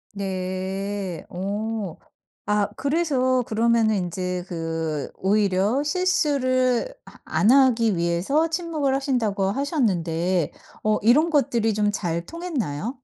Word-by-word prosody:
네. 190 0 -4
어. 200 0 -3 0.5
아 210 0 +1
그래서 275 -4 +1
그러면은 225 -1 +2
인제 180 0 -2
그 165 -3 -3
오히려 200 +5 +1
실수를 285 - +1
아 - - -14
안 210 - +2
하기 240 -6 +4
위해서 170 - +1
침묵을 320 -5 -1
하신다고 245 -8 0
하셨는데 185 - 0 0.3
어 215 0 +2
이런 285 +10 +4
것들이 235 -7 +2
좀 210 0 +1
잘 170 -4 -2
통했나요? 255 - -4
215 Hz, 225 characters per minute, -24 LUFS, 185-265 Hz, 0.5 s, 하기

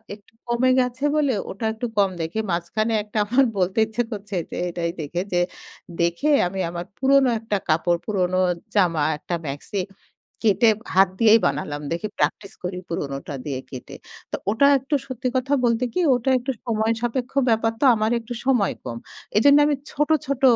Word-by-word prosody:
একটু 205 +1 -25
কমে 240 +2 +2
গেছে 250 +2 -1
বলে, 290 -3 +2 0.2
ওটা 210 +4 -5
একটু 225 +2 -5
কম 200 -1 +4
দেখি। 165 +6 -4
মাঝখানে 215 +7 -1
একটা 210 +1 -7
আমার 250 +6 +3
বলতে 185 +1 0
ইচ্ছা 230 +2 -1
করছে 205 -2 -6 0.2
যে, - - -5
এটাই 170 -1 -2
দেখে 170 +4 -3
যে, 175 - +2 0.6
দেখে 170 - 0 0.2
আমি 190 +2 -5
আমার 175 0 -5
পুরনো 270 0 +4
একটা 215 -2 -1
কাপড়, 170 +2 +2
পুরোনো 185 -3 0 0.4
জামা, 175 -6 +3 0.2
একটা 165 - -6
মাক্সি 145 +8 -5 0.7
কেটে 225 +2 +4 0.3
হাত 195 0 +6
দিয়েই 225 0 +6
বানালাম। 145 +1 -3
দেখি 170 +6 -2
প্র্যাকটিস 165 +6 -1
করি 180 0 -3
পুরনোটা 140 -3 -4
দিয়ে 135 -3 -3
কেটে। 130 -2 -9 0.4
তো - - -1 0.2
ওটা 225 +6 +3
একটু 270 +3 -2
সত্যি 255 -1 -3
কথা 265 +3 -1
বলতে 235 +1 +1
কি, - - 0 0.2
ওটা 245 +2 -1
একটু 255 +2 -3
সময় 220 -1 +1
সাপেক্ষ 245 +1 -2 0.2
ব্যাপার 225 0 +2
তো; - - +4
আমার 215 +1 0
একটু 235 +1 -7
সময় 245 -7 +2
কম। 115 - -5 0.4
এজন্য 285 +6 +6
আমি 295 - +2 0.2
ছোট, 295 +2 0 0.2
ছোট 280 -2 -2
215 Hz, 170 wpm, -23 LUFS, 175-245 Hz, 0.7 s, হাত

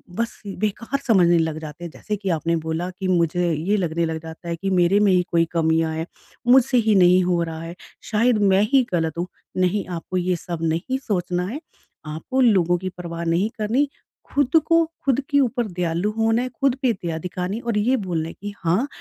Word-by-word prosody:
बस 230 +2 -3 0.2
बेकार 230 +6 -2
समझने 175 -6 +5
लग 160 -1 -1
जाते 155 +1 -9
हैं। 170 - -6
जैसे 210 +5 -4
कि 200 -1 -4
आपने 165 +2 0
बोला 160 +3 -2
कि 190 - -2
मुझे 175 -1 +1
ये 175 +8 0
लगने 170 -3 0
लग 160 0 -3
जाता 160 +1 -10
है 170 - -1
कि 195 +4 -3
मेरे 185 +2 +3
में 205 -2 +4
ही 180 -1 +3
कोई 165 -1 +3
कमियाँ 160 -1 +1
है, 160 +1 -3 0.4
मुझसे 255 +1 +5
ही 220 -3 +3
नहीं 180 0 +5
हो 175 -1 +1
रहा 165 -1 -5
है। 165 +1 -7 0.4
शायद 230 +1 +3
मैं 195 -1 +4
ही 265 -2 +5
गलत 165 -2 0
हूँ। 175 +1 -2 0.3
नहीं, 185 +2 +1
आपको 180 +1 -4
ये 180 0 +1
सब 170 0 -6
नहीं 165 +11 -1
सोचना 180 -3 -1
है 250 +9 -5 0.5
आपको 160 - -2
लोगों 185 -8 +4
की 185 +2 -4
परवाह 170 -2 -6
नहीं 170 +6 +1
करनी 240 +7 +1 0.5
ख़ुद 285 0 +1
को 330 0 +4 0.2
ख़ुद 270 -2 +2
के 285 - +3
ऊपर 245 -2 0
दयालु 175 +1 -1
होना 225 +1 +2
है 255 - -3
ख़ुद 260 +1 0
पे 255 -3 +3
दया 170 -5 -4
दिखानी 180 +4 -4
और 235 -3 -1
ये 235 +6 +2
बोलना 175 -7 -2
है - - -9
कि 205 0 -5
हाँ, 185 +11 +2
180 Hz, 210 wpm, -22 LUFS, 170-225 Hz, 0.5 s, समझने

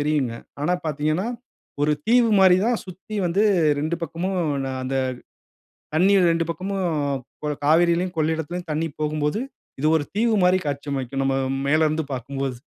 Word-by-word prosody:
தெரியுங்க. 145 -5 0 0.3
ஆனா, 175 - +1
பார்த்தீங்கனா 155 +6 0 0.6
ஒரு 150 +1 +3
தீவு 235 0 +5
மாரி 185 -1 +7
தான் 240 -2 +1
சுத்தி 190 +3 -10
வந்து 190 +5 +1 0.4
2 155 +3 -1
பக்கமும் 170 +4 -3 0.3
ந - - -3
அந்த 135 +1 -2 1.0
தண்ணீர் 185 +1 +4
2 165 0 +1
பக்கமும் 190 +3 -3 0.6
கொ - - 0 0.2
காவிரியிலும், 170 +3 +3
கொள்ளிடத்திலும் 160 +2 -2
தண்ணி 155 +2 0
போகும்போது, 150 +6 0 0.4
இது 150 - +1
ஒரு 145 - -1
தீவு 230 0 +2
மாரி 185 +1 +4
காட்சியமைக்கும் 140 -2 -2
நம்ம 135 0 +1 0.3
மேலருந்து 155 0 +2
பார்க்கும்போது. 135 +1 -4
160 Hz, 135 wpm, -23 LUFS, 145-185 Hz, 1.0 s, மாரி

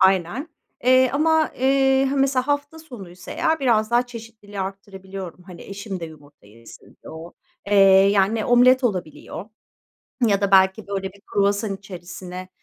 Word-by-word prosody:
Aynen, 190 - +2 0.4
eee, 255 0 +5
ama, 315 +2 +2
eee, 270 +1 +3
he, 270 - -1
mesela 270 -2 +1
hafta 285 +2 -2
sonuysa 195 - -12
eğer 320 -1 0
biraz 225 -4 +2
daha 240 +1 +2
çeşitliliği 225 -4 -10
arttırabiliyorum. 190 -2 -8
Hani 180 -2 -12
eşim 200 -1 -7
de - - -4
yumurta 145 -6 -15
yesin 115 +3 -16 0.2
diye - - -11
o. 160 +2 -10 0.3
Eee, 205 - 0 0.4
yani 205 +2 +1
omlet 250 +2 +4
olabiliyor 185 -3 -4 0.8
ya 200 -2 +2
da 200 -1 0
belki 190 -1 +4
böyle 195 -1 -4
bir 200 - -20
kruvasan 200 0 -1
içerisine, 185 -1 -9
200 Hz, 145 wpm, -22 LUFS, 190-255 Hz, 0.8 s, eee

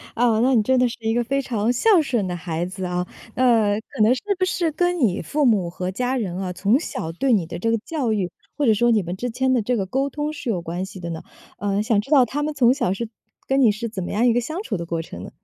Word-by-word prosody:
啊， 230 -2 +3
那 260 +2 +3
你 220 - +4
真 260 +2 +2
的 250 -1 +3
是 - - -8
一 225 0 0
个 240 0 +1
非 275 +4 0
常 230 -1 0
孝 370 - +4
顺 235 -9 -1
的 180 - -3
孩 170 -1 -3
子 185 0 -5
啊， 180 0 -1 0.3
呃， 225 -5 +3
可 220 - -6
能 230 +4 +5
是 - - -6 0.2
不 370 - +3
是 340 -3 0
跟 355 +2 0
你 205 -8 +2
父 295 -1 0
母 200 -7 +3
和 180 +1 -4
家 250 +5 -1
人 190 -7 -3
啊， 185 -2 -3
从 205 +9 +2
小 160 - -4
对 255 +10 0
你 190 -7 +2
的 170 - -7
这 230 - 0
个 230 - +2
教 285 -8 -1
育， 195 -5 -1 0.3
或 290 - +1
者 220 - +5
说 240 +3 +2
你 215 -5 +3
们 175 +2 -4
之 245 +5 -3
间 260 +2 +1
的 245 - +2
这 240 +3 0
个 195 - -1
沟 270 +7 -1
通 300 +2 -3
是 290 -5 -5
有 185 -5 0
关 175 +2 -4
系 190 -1 -10
的 170 -1 -5
呢？ 160 - -5 0.4
嗯， 200 0 0
想 215 -2 +2
知 270 - -15
道 270 -5 +6
他 285 +6 -3
们 305 +1 -1
从 250 -2 +5
小 190 -10 0
是 230 +3 -4 0.4
跟 270 +1 +2
你 230 -5 +6
是 230 +3 -4
怎 195 -4 -5
么 - - -5
样 225 +4 +2
一 240 - +4
个 245 - +2
相 320 - -4
处 215 - -3
的 170 -1 -5
过 165 -1 -2
程 90 - -9
呢？ - - -8
230 Hz, 310 characters per minute, -22 LUFS, 190-260 Hz, 0.4 s, 道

